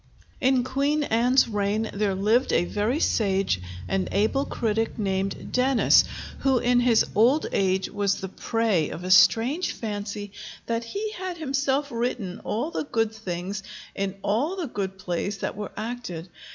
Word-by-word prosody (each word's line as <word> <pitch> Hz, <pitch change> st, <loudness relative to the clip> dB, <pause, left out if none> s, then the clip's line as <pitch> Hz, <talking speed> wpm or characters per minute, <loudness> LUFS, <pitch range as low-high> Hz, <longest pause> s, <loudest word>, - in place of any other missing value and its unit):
In 260 Hz, -1 st, +3 dB
Queen 280 Hz, +4 st, 0 dB
Anne's 245 Hz, +1 st, +3 dB
reign 210 Hz, 0 st, -1 dB
there 200 Hz, -1 st, 0 dB
lived 220 Hz, +7 st, +2 dB
a 175 Hz, -, +3 dB
very 210 Hz, -, 0 dB
sage 195 Hz, -, +1 dB, 0.3 s
and 195 Hz, -1 st, -1 dB
able 220 Hz, +7 st, +1 dB
critic 225 Hz, 0 st, -1 dB
named 195 Hz, -2 st, -2 dB
Dennis, 255 Hz, 0 st, +4 dB, 0.3 s
who 265 Hz, -2 st, +3 dB
in 245 Hz, 0 st, +3 dB
his 240 Hz, -2 st, +4 dB
old 250 Hz, +8 st, +4 dB
age 190 Hz, -1 st, +1 dB
was 200 Hz, -1 st, 0 dB
the 190 Hz, -, -5 dB
prey 210 Hz, -5 st, 0 dB
of 170 Hz, -, -7 dB
a 185 Hz, -, -2 dB
strange 240 Hz, -, +4 dB
fancy 205 Hz, -2 st, -5 dB, 0.3 s
that 230 Hz, 0 st, -1 dB
he 415 Hz, -, -4 dB
had 370 Hz, -3 st, -5 dB
himself 275 Hz, -1 st, 0 dB
written 230 Hz, -6 st, -3 dB
all 245 Hz, +10 st, -2 dB
the -, -, -3 dB
good 225 Hz, -5 st, 0 dB
things 195 Hz, -2 st, -4 dB, 0.3 s
in 195 Hz, -1 st, -2 dB
all 235 Hz, -, 0 dB
the 365 Hz, -3 st, -3 dB
good 195 Hz, -6 st, -4 dB
plays 190 Hz, +2 st, -3 dB
that -, -, -3 dB
were 205 Hz, -1 st, -6 dB
acted. 215 Hz, -7 st, -5 dB
220 Hz, 155 wpm, -25 LUFS, 195-255 Hz, 0.3 s, Dennis